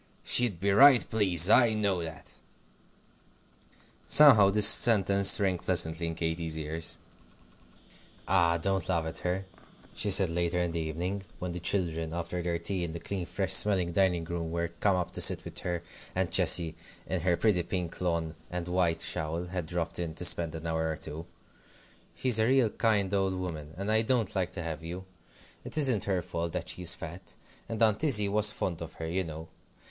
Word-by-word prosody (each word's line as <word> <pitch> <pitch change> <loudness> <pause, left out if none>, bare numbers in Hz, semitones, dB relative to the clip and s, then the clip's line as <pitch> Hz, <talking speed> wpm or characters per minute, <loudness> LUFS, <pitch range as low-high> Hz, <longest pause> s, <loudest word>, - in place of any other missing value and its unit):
She'd 120 -8 -1
be 100 +2 0
right 130 +4 +5
pleased; 95 -6 +3
I 120 -3 +4
know 100 -4 -1
that." 80 -2 -10 1.7
Somehow, 125 -10 +7
this 105 +1 +8
sentence 100 -3 +6
rang 95 -3 -1
pleasantly 85 -2 0
in 80 - -5
Katy's 80 -1 -3
ears. 80 +1 -4 1.3
"Ah! 85 -2 +2
don't 95 0 -2
laugh 85 -3 -1
at 80 - -7
her," 90 +2 -3 0.5
she 105 - -3
said 95 -3 +5
later 85 +1 -2
in 90 -1 -2
the 85 - -4
evening, 85 +5 -4 0.2
when 90 -1 -6
the 90 - -6
children, 80 -3 -1
after 85 +1 -5
their 85 0 -3
tea 95 +1 -3
in 80 -2 -5
the 85 - -7
clean, 95 -1 -6
fresh - - -3
smelling 95 -4 +2
dining 90 -2 0
room, 85 0 -5
were 85 0 -3
come 90 +3 -1
up 90 -2 -3
to - - -3
sit - - +4
with - - -6
her, 85 -1 -5 0.3
and 90 -2 -2
Cecy, 80 -2 +4 0.3
in 95 -2 -3
her 85 0 0
pretty 105 -6 +1
pink 90 -1 -6
lawn 85 -3 -2 0.2
and 90 -1 -6
white 90 -2 -1
shawl, 80 +2 -4
had 90 -2 -6
dropped 85 -1 -4
in 85 -2 -5
to 90 - -6
spend 85 -2 +4
an 80 0 -9
hour 80 0 -2
or 80 - -4
two; 80 +4 -9 0.9
"she's 125 -4 +2
a 110 - +2
real 130 -4 +2
kind 100 -4 -1
old 95 -1 -1
woman, 80 -5 -7
and 100 +3 -3
I 110 0 +3
don't 115 -3 -2
like 95 -2 -1
to 90 -3 -5
have 80 -1 -6
you. 90 +3 -8 0.6
It - - -9
isn't 130 -9 +3
her 95 -3 -2
fault 85 -1 -5
that 90 -2 -5
she's 90 -2 0
fat. 85 +3 -10 0.3
And 115 -2 -5
Aunt 110 +5 +1
Izzie 110 -10 +5
was 105 +1 +3
fond 85 -3 -5
of 80 - -8
her, 80 - -7
you 90 +4 -2
know. 80 -1 -9
90 Hz, 190 wpm, -28 LUFS, 85-100 Hz, 1.7 s, this